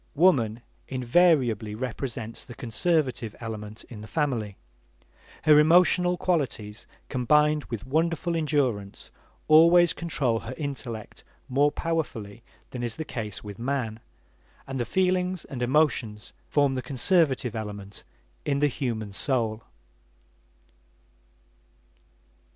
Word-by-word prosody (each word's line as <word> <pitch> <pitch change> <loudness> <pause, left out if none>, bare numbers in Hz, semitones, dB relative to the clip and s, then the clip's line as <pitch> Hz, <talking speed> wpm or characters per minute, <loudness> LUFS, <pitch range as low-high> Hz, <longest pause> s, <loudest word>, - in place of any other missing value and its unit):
Woman 125 -9 +3 0.2
invariably 125 - +2
represents 115 -1 -5
the 120 - -11
conservative 130 -2 0
element 110 -2 -6
in 110 -4 -11
the 110 - -9
family. 120 -10 -2 0.9
Her 150 -1 +7
emotional 180 +3 +4
qualities, 125 - -2 0.2
combined 150 +4 +2
with 115 -5 -6
wonderful 165 +4 0
endurance, 135 -11 -1 0.4
always 170 +3 +7
control 140 -9 -1
her 130 - -7
intellect 125 -7 -6 0.2
more 140 +2 +3
powerfully 120 -12 -3 0.3
than 125 - -5
is 120 -2 -2
the 160 - -5
case 105 -8 -6
with 105 -1 -9
man; 120 -3 -2 0.7
and 135 -1 -5
the 120 - 0
feelings 185 - 0
and 130 -3 -7
emotions 125 -6 +1
form 145 -2 +2
the 130 - -2
conservative 135 - +1
element 105 -2 -6 0.4
in 140 - 0
the 145 +1 +3
human 115 -7 -3
soul. 115 -1 0
130 Hz, 110 wpm, -26 LUFS, 110-155 Hz, 0.9 s, Her